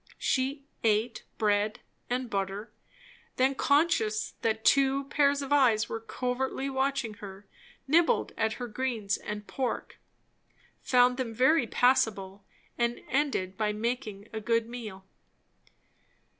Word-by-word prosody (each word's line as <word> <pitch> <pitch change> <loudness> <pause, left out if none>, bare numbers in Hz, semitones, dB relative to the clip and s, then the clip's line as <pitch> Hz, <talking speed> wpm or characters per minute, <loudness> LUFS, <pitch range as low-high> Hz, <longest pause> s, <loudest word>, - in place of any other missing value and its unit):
She 275 +2 -1 0.2
eat 220 +1 +1
bread 210 0 +1 0.3
and 250 +1 -1
butter, 200 +1 -3 0.6
then 260 +2 +3
conscious 270 -8 +1
that 220 -1 -1
two 275 0 +4
pair 285 -1 +4
of 280 0 -1
eyes 240 -7 +4
were 225 - -3
covertly 260 +4 -3
watching 265 -4 -1
her, 200 0 -9 0.4
nibbled 340 - +3
at 220 0 0
her 245 +1 -5
greens 225 -3 -2
and 210 0 -6
pork; 260 +3 -4 0.8
found 250 0 +4
them 235 -4 -3
very 260 +2 +4
passable, 205 -6 +1 0.4
and 235 0 0
ended 250 -9 0
by 210 -1 +1
making 215 -2 -3
a 220 - -3
good 230 +1 +1
meal. 215 -6 -8
235 Hz, 120 wpm, -29 LUFS, 215-265 Hz, 0.8 s, two